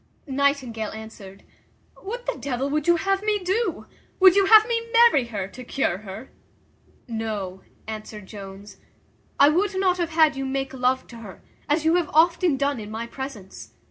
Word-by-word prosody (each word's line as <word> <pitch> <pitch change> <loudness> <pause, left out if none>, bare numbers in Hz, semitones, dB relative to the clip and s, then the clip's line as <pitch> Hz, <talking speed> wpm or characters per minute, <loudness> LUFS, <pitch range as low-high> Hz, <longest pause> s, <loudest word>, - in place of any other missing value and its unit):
Nightingale 265 -6 -1
answered, 215 -3 -11 0.5
"What 485 +5 -7
the - - -2
devil 275 0 -3
would 300 +1 -1
you 345 - +5
have 390 +3 0
me 425 0 +1
do? 380 0 -2 0.3
would 375 -1 +7
you 395 -1 +4
have 435 +1 +8
me 460 -1 -2
marry 465 - +5
her 205 -5 -4
to 255 - -10
cure 235 -7 -1
her?" 215 +4 -10 0.8
"No," 215 -5 -4 0.2
answered 215 -1 -8
Jones, 195 0 -11 0.6
"I 280 - +7
would 380 +5 0
not 365 -1 +1
have 340 -2 -1
had 315 -3 +3
you 270 - -4
make 270 0 -3
love 260 0 0
to 235 - -11
her, 210 -5 -12 0.3
as 305 +2 +1
you 325 +2 +4
have 345 -3 -1
often 335 -1 +3
done 280 -2 -1
in 210 -1 -8
my 225 +2 -5
presence. 235 -6 -9
275 Hz, 175 wpm, -24 LUFS, 220-360 Hz, 0.8 s, have